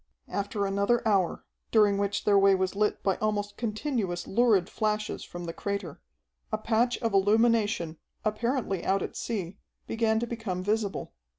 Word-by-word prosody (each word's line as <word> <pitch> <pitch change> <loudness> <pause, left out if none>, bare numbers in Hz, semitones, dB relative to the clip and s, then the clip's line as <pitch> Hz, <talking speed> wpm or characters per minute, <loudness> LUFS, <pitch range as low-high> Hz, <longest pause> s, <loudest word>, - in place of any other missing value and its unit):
After 200 0 -2
another 200 +4 +1
hour, 195 -5 +1 0.2
during 205 -3 +4
which 200 0 -1
their 205 -1 +5
way 195 0 +6
was 190 0 -1
lit 210 +1 0
by 195 -2 +1
almost 205 -1 -1
continuous 215 -5 -2
lurid 210 -4 +3
flashes 215 0 -2
from 175 0 -8
the 165 -1 -5
crater, 200 -5 -4 0.5
a - - +1
patch 240 +2 +1
of 225 -2 0
illumination, 205 -4 +2 0.3
apparently 215 -3 -1
out 195 0 +1
at - - -6
sea, 200 -4 -4 0.3
began 225 -1 +1
to 235 - -1
become 225 -6 -4
visible. 210 0 -1
205 Hz, 155 wpm, -28 LUFS, 195-225 Hz, 0.5 s, way